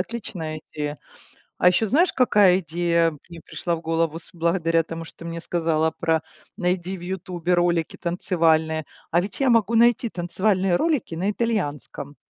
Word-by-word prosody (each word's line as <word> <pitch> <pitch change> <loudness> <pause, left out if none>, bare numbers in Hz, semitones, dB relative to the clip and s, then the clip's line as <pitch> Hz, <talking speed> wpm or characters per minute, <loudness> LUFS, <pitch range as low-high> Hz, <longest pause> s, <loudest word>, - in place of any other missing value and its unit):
отличная 175 -7 -5
идея. 150 -2 -4 0.6
А - - +4
еще 195 +5 +3
знаешь, 330 - +3
какая 205 -7 +5
идея 170 0 +1 0.2
мне 170 - -10
пришла 170 -1 -3
в 165 - -8
голову 165 0 -1
с - - -14
благодаря 165 -1 +1
тому, 165 0 -7
что - - -14
ты 170 - -9
мне 170 0 -5
сказала 160 -2 +1
про: 160 -1 0 0.4
"Найди 180 +1 -1
в - - -12
"Ютубе" 180 -1 -2
ролики 175 -2 +1
танцевальные". 160 -3 +1 0.3
А 170 +2 +3
ведь 195 +1 -6
я 265 - +3
могу 230 -1 +3
найти 235 0 +4
танцевальные 185 +1 0
ролики 285 - 0
на 190 +5 0
итальянском. 150 - -3
175 Hz, 160 wpm, -23 LUFS, 165-190 Hz, 0.6 s, какая